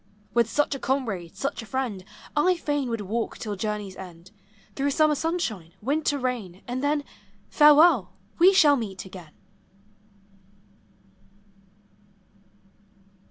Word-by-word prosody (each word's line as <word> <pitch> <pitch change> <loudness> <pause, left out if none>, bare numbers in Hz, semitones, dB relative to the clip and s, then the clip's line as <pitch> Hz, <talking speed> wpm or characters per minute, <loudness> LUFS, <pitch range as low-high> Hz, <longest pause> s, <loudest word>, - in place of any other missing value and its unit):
With 235 -1 +2
such 295 +2 +1
a 275 - -5
comrade, 225 -12 -2
such 275 -2 -3
a - - -10
friend, 245 -8 -3 0.3
1 360 +5 +3
fain 290 -5 -2
would 230 -2 -2
walk 220 +4 -3
till 210 -2 -4
journeys 210 -1 -4
end, 180 -1 -11 0.4
Through 280 +1 0
summer 310 +2 +3
sunshine, 255 - -3
winter 290 +4 0
rain, 235 -8 -4
And 250 +2 -3
then? 290 0 +1 0.3
— 200 0 -34
Farewell, 295 - +6 0.3
we 360 +3 +8
shall 310 -7 +6
meet 195 -6 -5
again! 180 -5 -12
245 Hz, 120 wpm, -25 LUFS, 195-290 Hz, 0.4 s, we